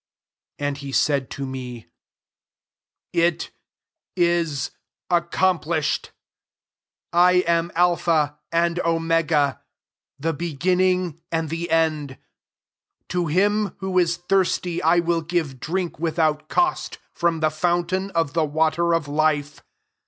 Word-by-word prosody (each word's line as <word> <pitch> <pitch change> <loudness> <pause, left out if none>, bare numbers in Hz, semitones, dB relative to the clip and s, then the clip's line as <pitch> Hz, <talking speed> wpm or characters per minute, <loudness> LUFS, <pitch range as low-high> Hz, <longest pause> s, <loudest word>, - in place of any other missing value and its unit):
6 145 - -3
And 140 -1 -3
he 140 -1 -7
said 140 -1 +1
to 140 - -5
me, 125 -3 -7 1.3
"It 170 0 +1 0.6
is 170 -6 +1 0.4
accomplished. 170 -2 +1 1.0
I 180 +1 +5
am 170 0 +1
Alpha 165 -4 +2
and 170 +1 +1
Omega, 165 -4 +1 0.6
the 165 +3 -1
beginning 180 +2 0
and 165 -2 -1
the 170 +1 -3
end. 155 -4 0 0.9
To 175 -1 -1
him 205 +5 +1
who 190 -1 0
is 170 -1 +1
thirsty 180 -1 0
1 170 +2 +3
will 170 -1 +1
give 160 -5 -2
drink 175 +3 -3
without 155 -2 0
cost 355 0 0 0.2
from 170 -1 0
the 155 -1 +2
fountain 175 +4 0
of 165 -4 +1
the 165 - +2
water 160 +3 +1
of 160 -3 -2
life. 150 -1 0
165 Hz, 115 wpm, -23 LUFS, 155-175 Hz, 1.3 s, I